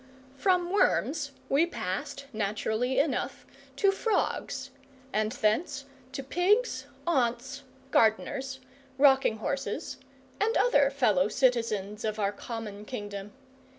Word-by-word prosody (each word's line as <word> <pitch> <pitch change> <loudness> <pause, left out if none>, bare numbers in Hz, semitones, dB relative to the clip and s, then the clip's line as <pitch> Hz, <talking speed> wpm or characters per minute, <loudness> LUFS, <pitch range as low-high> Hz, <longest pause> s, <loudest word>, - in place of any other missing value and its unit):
From 355 +5 +1
worms 300 -7 +2 0.2
we 295 +5 +3
passed, 195 - -4
naturally 220 +4 -1
enough, 275 -3 0 0.3
to 395 -2 +4
frogs, 410 +1 -1 0.4
and 215 0 +1
thence 275 +6 0 0.3
to 275 0 -4
pigs, 390 - +1 0.2
aunts, 265 -3 0 0.3
gardeners, 265 +4 +2 0.4
rocking 270 -5 +5
horses, 275 +5 -3 0.4
and 445 +3 +2
other 285 - +4
fellow 215 -9 +3
citizens 220 -5 0
of 215 -1 -1
our 200 -2 +1
common 210 -1 -6
kingdom. 205 -3 -6
260 Hz, 105 wpm, -29 LUFS, 215-285 Hz, 0.4 s, rocking